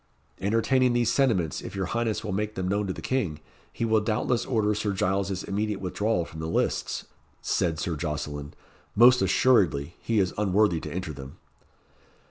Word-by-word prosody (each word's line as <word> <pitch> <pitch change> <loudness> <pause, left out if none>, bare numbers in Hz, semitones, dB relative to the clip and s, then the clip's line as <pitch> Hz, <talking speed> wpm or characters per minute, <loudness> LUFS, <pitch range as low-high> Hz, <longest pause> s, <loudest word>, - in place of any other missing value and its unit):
"Entertaining 115 +5 +2
these 120 -1 +2
sentiments, 100 - +1
if - - -8
your 95 -1 -1
highness 115 +3 -1
will 105 - -3
make 105 +2 -2
them 95 -1 -2
known 100 +2 0
to 95 - -2
the - - -9
King, 100 - -1 0.3
he 115 - -2
will 110 -1 +3
doubtless 110 +3 0
order 110 -4 +1
Sir 105 -1 -1
Giles's 95 0 -1
immediate 105 0 -2
withdrawal 95 0 -1
from 80 - -10
the 80 - -3
lists," 80 - -1 0.3
said 80 -2 0
Sir 85 +1 -2
Jocelyn. 75 -1 -4 0.4
"Most 125 +4 +7
assuredly 95 - +3
he 115 - -1
is 95 -3 +2
unworthy 100 -3 +2
to - - -7
enter 90 -3 -4
them." 65 0 -10
100 Hz, 170 wpm, -26 LUFS, 85-110 Hz, 0.4 s, Most